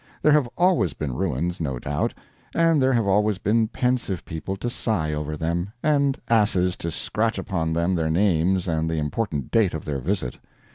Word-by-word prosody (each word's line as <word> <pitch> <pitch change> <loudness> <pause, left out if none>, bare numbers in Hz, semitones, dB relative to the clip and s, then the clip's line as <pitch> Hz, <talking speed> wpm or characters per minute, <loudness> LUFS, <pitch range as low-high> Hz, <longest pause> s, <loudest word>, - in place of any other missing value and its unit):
There 150 - +5
have 145 -5 +3
always 175 - +3
been 70 -4 -4
ruins, 85 +1 -2
no 70 -5 -2
doubt; 70 +4 -2 0.4
and 165 -3 +4
there 130 0 +3
have 115 -3 +2
always 105 +1 +2
been 110 +4 +2
pensive 125 -6 -1
people 85 +3 -5
to 120 - -4
sigh 105 -10 -1
over 75 0 -3
them, 85 +5 -2
and 140 -3 +2
asses 95 -5 +3
to 85 - -3
scratch 110 +7 -1
upon 85 -4 -2
them 85 +3 +1
their 80 -3 0
names 90 +1 +2
and 80 -1 0
the 80 - -1
important 75 - -2
date 105 -7 +3
of 80 - -6
their 70 -3 -2
visit. 75 -4 -2
95 Hz, 185 wpm, -24 LUFS, 80-115 Hz, 0.4 s, There